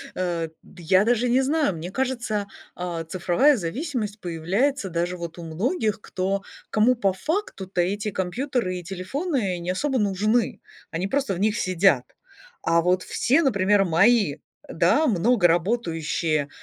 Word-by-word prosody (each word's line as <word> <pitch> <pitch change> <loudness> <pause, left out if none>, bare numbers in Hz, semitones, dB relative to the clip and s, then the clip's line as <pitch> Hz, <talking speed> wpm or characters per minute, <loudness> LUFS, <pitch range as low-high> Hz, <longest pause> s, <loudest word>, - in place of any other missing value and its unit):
э, 170 -3 -2
д 175 -2 -15
я 185 +5 +4
даже 240 +1 +2
не 255 +2 +4
знаю. 285 - +1
Мне 165 +3 -6
кажется, 240 -5 -2 0.3
а, 175 -2 -4
цифровая 185 - +3
зависимость 215 - -3
появляется 190 - -1
даже 175 +2 -2
вот 170 -1 -7
у 170 - -7
многих, 215 - -1
кто 195 +1 -2 0.3
кому 225 +4 +3
по 200 -5 +1
факту-то 195 - -2
эти 205 +4 -1
компьютеры 190 +1 -2
и 180 - -7
телефоны 195 - -2
не 175 +1 -2
особо 270 +8 -1
нужны. 210 +3 +1 0.3
Они 175 +3 -2
просто 270 -1 0
в 175 - -5
них 215 +2 +1
сидят, 185 +1 +3 0.6
а 170 0 +3
вот 180 +2 +1
все, 275 +7 +2
например, 200 -6 +3
мои, 190 -1 +3 0.3
да, 180 - +3
много 210 -2 +3
работающие, 165 -5 0
195 Hz, 145 wpm, -24 LUFS, 175-240 Hz, 0.6 s, я